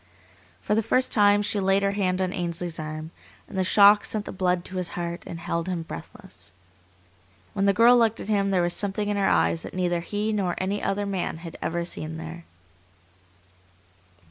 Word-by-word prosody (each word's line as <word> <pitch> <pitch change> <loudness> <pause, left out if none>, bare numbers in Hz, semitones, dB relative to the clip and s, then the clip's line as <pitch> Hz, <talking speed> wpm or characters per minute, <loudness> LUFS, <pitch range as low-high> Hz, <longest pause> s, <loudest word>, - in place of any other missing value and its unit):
For - - 0
the 220 - +3
first 255 +4 +1
time 205 -1 +4
she 205 0 0
laid 195 +1 +2
her 200 - +2
hand 190 -2 0
on 185 0 -2
Ainsley's 170 -2 -3
arm, 155 +1 -6 0.4
and - - -11
the 190 - +1
shock 205 +2 +6
sent 210 -1 -3
the - - -6
blood 180 -2 0
to 190 - -6
his 180 -2 -1
heart 170 0 -4
and 170 - -6
held 170 0 -3
him 175 -3 -2
breathless. - - -10 1.0
When 195 -2 0
the 200 - +5
girl 230 +4 +6
looked 225 -1 +2
at - - -7
him 200 -2 +1
there 185 -3 +2
was 175 0 0
something 205 +1 -1
in 205 - 0
her 195 - +2
eyes 80 0 +2
that - - -8
neither 175 -2 0
he 205 +5 -2
nor 190 -4 0
any 195 +2 -2
other 205 +1 -1
man 190 -5 -2
had 165 - -8
ever 170 +1 -2
seen 160 -2 -5
there. 165 +1 -8
185 Hz, 195 wpm, -25 LUFS, 170-205 Hz, 1.0 s, shock